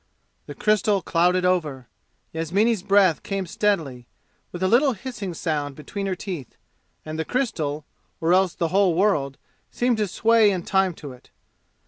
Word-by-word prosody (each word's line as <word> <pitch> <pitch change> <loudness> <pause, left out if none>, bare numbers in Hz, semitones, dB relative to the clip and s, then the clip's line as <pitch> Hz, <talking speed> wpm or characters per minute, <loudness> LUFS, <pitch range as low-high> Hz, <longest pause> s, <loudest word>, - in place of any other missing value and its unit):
The - - -8
crystal 210 -2 +1
clouded 180 +2 +2
over. 150 -9 -1 0.5
Yasmini's 195 +7 +1
breath 195 -4 +3
came 195 -1 -3
steadily, 160 - -1 0.4
with 175 +1 -5
a - - +3
little 260 +6 +4
hissing 205 -5 -6
sound 145 -4 -2
between 195 +7 -5
her 190 - -1
teeth, 175 - -7 0.5
and 155 0 -6
the - - 0
crystal, 155 - -2 0.3
or 165 +2 +2
else 185 -2 +2
the 170 - -1
whole 190 -2 +3
world, 150 -8 +1 0.3
seemed 245 -1 0
to 210 -1 0
sway 225 +3 +3
in 185 -3 -2
time 190 -3 +1
to 145 -4 -9
it. 125 -1 -16
185 Hz, 155 wpm, -23 LUFS, 160-205 Hz, 0.5 s, little